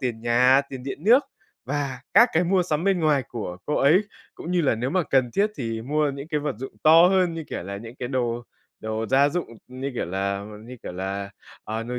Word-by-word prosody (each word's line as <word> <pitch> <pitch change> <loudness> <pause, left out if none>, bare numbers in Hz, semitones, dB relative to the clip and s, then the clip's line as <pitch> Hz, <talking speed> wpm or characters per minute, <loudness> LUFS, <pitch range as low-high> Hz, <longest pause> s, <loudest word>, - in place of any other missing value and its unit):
tiền 120 -4 -3
nhà, 125 +3 +4
tiền 130 -2 -7
điện 140 +5 -6
nước 250 +6 +6 0.4
và 140 -1 -3
các 240 - +8
cái 170 +2 +2
mua 185 +1 +2
sắm 160 0 -2
bên 195 -3 +2
ngoài 150 -4 +2
của 105 -7 -5
cô 150 - -1
ấy 155 +7 +5 0.3
cũng 170 - -7
như 180 -1 +2
là 135 - +2
nếu 125 +4 -2
mà 185 -1 +1
cần 130 -3 +3
thiết 205 - +1
thì 115 -3 -4
mua 150 +2 0
những 140 +3 -8
cái 150 -3 -1
vật 145 -3 -2
dụng 130 - -7
to 165 +3 +7
hơn, 185 -3 +2
như 165 -2 -5
kiểu - - -4
là, 100 +2 -6
những 115 +3 -9
cái 125 - -4
đồ 120 -2 -1 0.4
đồ 110 +1 -3
gia 140 +3 +4
dụng, 175 +3 -2 0.2
ừm, 130 +1 -10
như 140 +1 -2
kiểu - - -2
là 100 +2 -2 0.2
như 125 +2 -10
kiểu - - -6
là, 100 +2 -4 0.3
ờ, 110 +1 -3
nồi 125 +1 -4
135 Hz, 240 wpm, -24 LUFS, 115-155 Hz, 0.4 s, các